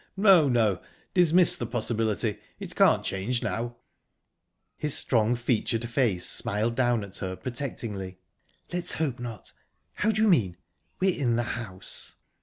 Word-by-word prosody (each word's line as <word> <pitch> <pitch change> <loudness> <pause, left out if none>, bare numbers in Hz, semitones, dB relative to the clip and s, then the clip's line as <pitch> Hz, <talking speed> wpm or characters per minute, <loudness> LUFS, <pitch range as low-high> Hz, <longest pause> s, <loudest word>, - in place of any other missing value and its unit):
"No, 190 -7 +6
no. 110 -7 +2 0.3
Dismiss 175 -1 +5
the 120 - -4
possibility. 110 -2 -1 0.2
It - - -6
can't - - +4
change 110 +6 -2
now." 120 +1 -3 1.0
His 150 -2 +1
strong 115 -1 +3
featured 120 -1 -1
face 115 -8 0
smiled 110 +3 -1
down 120 -3 +1
at 100 -1 -7
her 95 -1 -4
protectingly. 110 -7 -5 0.6
"Let's 175 0 0
hope 140 -6 -2
not...How 120 - -6
do 215 +1 +1
you - - +4
mean 105 - +2 0.4
'we're 190 0 +2
in 120 -4 +1
the 120 - +1
house'?" 95 -6 -6
120 Hz, 135 wpm, -27 LUFS, 105-140 Hz, 1.0 s, No